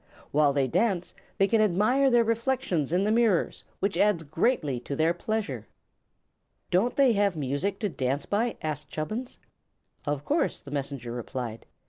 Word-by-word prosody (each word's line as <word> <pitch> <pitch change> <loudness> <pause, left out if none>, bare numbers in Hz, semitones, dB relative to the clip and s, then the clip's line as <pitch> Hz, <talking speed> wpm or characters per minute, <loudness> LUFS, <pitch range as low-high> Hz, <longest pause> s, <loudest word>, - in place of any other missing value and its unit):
While 145 -1 +4
they 140 -1 +1
dance 185 - 0 0.2
they 195 - +4
can 220 +1 +3
admire 215 +8 +3
their 240 -2 +5
reflections 230 - 0
in 180 +3 +2
the 210 - +1
mirrors, 225 -6 +2 0.2
which 200 0 0
adds 205 -5 +3
greatly 155 - 0
to 140 +3 -5
their 160 +2 +2
pleasure." 175 - -3 1.0
"Don't 200 +8 +2
they 270 -4 +5
have 200 -3 +2
music 150 +7 -1
to 210 - 0
dance 135 -2 -2
by?" 225 +3 0
asked 150 -1 -3
Chubbins. 215 +11 -4 0.7
"Of 145 -1 -2
course," 315 +3 0
the 140 - -11
Messenger 140 -4 -3
replied. 120 -1 -5
175 Hz, 155 wpm, -27 LUFS, 140-220 Hz, 1.0 s, their